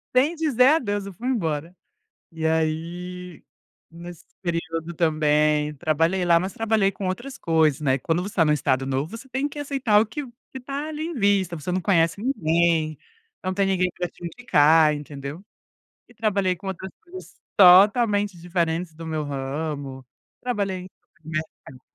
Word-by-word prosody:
Sem 285 Hz, +7 st, +3 dB
dizer 280 Hz, -6 st, +3 dB
adeus, 205 Hz, -10 st, +1 dB
eu 200 Hz, -, -7 dB
fui 235 Hz, +8 st, -6 dB
embora. 170 Hz, -, -2 dB, 0.6 s
E 160 Hz, -1 st, -2 dB
aí, 170 Hz, +2 st, -3 dB, 0.5 s
nesse 170 Hz, 0 st, -10 dB, 0.2 s
período 165 Hz, -1 st, -3 dB
também, 150 Hz, -2 st, +2 dB
trabalhei 165 Hz, +4 st, +1 dB
lá, 170 Hz, -1 st, +5 dB
mas 185 Hz, +2 st, -4 dB
trabalhei 220 Hz, -3 st, +1 dB
com 195 Hz, 0 st, -5 dB
outras 250 Hz, +9 st, -5 dB
coisas, 160 Hz, -, +2 dB
né. 135 Hz, -2 st, +2 dB
Quando 165 Hz, +6 st, -1 dB
você 200 Hz, -, -5 dB
está 170 Hz, -, +3 dB
num 150 Hz, -, +3 dB
Estado 135 Hz, -2 st, 0 dB
novo, 135 Hz, +4 st, -2 dB
você 255 Hz, +4 st, -11 dB
tem 265 Hz, +3 st, -1 dB
que 295 Hz, 0 st, -9 dB
aceitar 270 Hz, -7 st, +2 dB
o -, -, +1 dB
que 295 Hz, +7 st, -5 dB
o 250 Hz, -, -11 dB, 0.2 s
que -, -, -7 dB
está 275 Hz, +3 st, -5 dB
ali, 310 Hz, 0 st, -5 dB
em 340 Hz, -, -4 dB
vista. 200 Hz, -, +1 dB
Você 160 Hz, +3 st, -5 dB
não 185 Hz, +1 st, 0 dB
conhece 165 Hz, -1 st, +2 dB
ninguém, 165 Hz, -, +1 dB, 0.5 s
não 185 Hz, 0 st, -1 dB
tem 195 Hz, 0 st, +1 dB
ninguém 185 Hz, -1 st, +1 dB
pra 175 Hz, -, 0 dB
te 175 Hz, -, -18 dB
indicar, 160 Hz, -6 st, +4 dB
entendeu. 145 Hz, +3 st, -8 dB, 0.7 s
E -, -, -19 dB
trabalhei 200 Hz, -4 st, 0 dB
com 195 Hz, -, -12 dB
outras 190 Hz, 0 st, -5 dB
coisas 370 Hz, +2 st, -11 dB, 0.2 s
totalmente 205 Hz, +1 st, +6 dB
diferentes 170 Hz, -1 st, -2 dB
do 165 Hz, +1 st, -9 dB
meu 155 Hz, -1 st, -2 dB
ramo. 140 Hz, -1 st, -4 dB, 0.4 s
Trabalhei 205 Hz, -6 st, -1 dB
em 180 Hz, -, -10 dB
supermercado. 155 Hz, -5 st, -8 dB
175 Hz, 165 wpm, -24 LUFS, 160-205 Hz, 0.7 s, totalmente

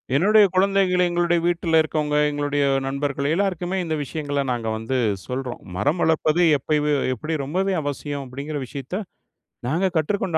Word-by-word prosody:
என்னுடைய 210 Hz, +8 st, +6 dB
குழந்தைகளு 190 Hz, -1 st, +3 dB
எங்களுடைய 175 Hz, 0 st, +2 dB
வீட்டுலருக்கவங்க, 160 Hz, -3 st, +1 dB
எங்களுடைய 145 Hz, 0 st, -1 dB, 0.2 s
நண்பர்கள் 140 Hz, 0 st, -2 dB
எல்லாருக்குமே 185 Hz, 0 st, -1 dB
இந்த 160 Hz, -2 st, -2 dB
விஷயங்கள 145 Hz, 0 st, -3 dB
நாங்க 120 Hz, -2 st, -2 dB
வந்து 115 Hz, +4 st, -3 dB, 0.3 s
சொல்றோம். 125 Hz, -1 st, -4 dB, 0.2 s
மரம் 145 Hz, -, 0 dB
வளர்ப்பது 160 Hz, +1 st, +2 dB, 0.2 s
எப்பவே 150 Hz, +2 st, 0 dB, 0.2 s
எப்பிடி 155 Hz, +7 st, -4 dB
ரொம்பவே 190 Hz, +7 st, 0 dB
அவசியம் 145 Hz, 0 st, -4 dB
அப்டிங்குற 140 Hz, +4 st, -5 dB
விஷயத்த, 140 Hz, -, -5 dB, 0.7 s
நாங்க 180 Hz, +6 st, +1 dB
கற்றுக்கொண்ட 170 Hz, +1 st, 0 dB
155 Hz, 125 wpm, -23 LUFS, 140-175 Hz, 0.7 s, என்னுடைய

